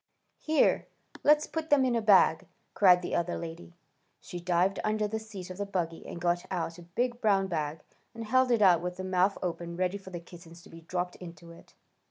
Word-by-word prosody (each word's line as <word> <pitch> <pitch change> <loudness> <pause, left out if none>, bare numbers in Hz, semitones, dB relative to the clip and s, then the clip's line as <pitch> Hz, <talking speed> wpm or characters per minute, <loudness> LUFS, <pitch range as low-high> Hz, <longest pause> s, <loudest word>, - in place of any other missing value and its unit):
"Here! 315 0 +2 0.4
Let's 300 +1 +5
put 320 -1 -5
them 280 -3 +4
in 250 -2 +1
a 230 - +1
bag!" 195 -6 +4 0.3
cried 180 -3 +5
the - - -4
other 170 +1 -1
lady. 170 +1 -8 0.4
She 175 - -8
dived 180 +2 +1
down - - -3
under 215 -1 0
the 220 +1 -3
seat 200 -5 -9
of 185 - -9
the 205 - -1
buggy 170 -4 -3
and - - -7
got 175 0 0
out 170 -2 -3
a 175 +1 -17
big 245 0 -1
brown 195 -3 +3
bag, 155 -4 -3 0.3
and 230 - -6
held 255 +3 +3
it 230 -3 +3
out 175 -4 +5
with 180 0 -4
the 185 - -5
mouth 185 +1 +1
open 170 -1 -4
ready 185 +2 -1
for 190 - -12
the 175 -2 -6
kittens 170 0 -14
to - - -16
be 165 0 -12
dropped 180 +2 -4
into 170 -1 -11
it. 170 - -17
180 Hz, 220 wpm, -29 LUFS, 170-210 Hz, 0.4 s, Let's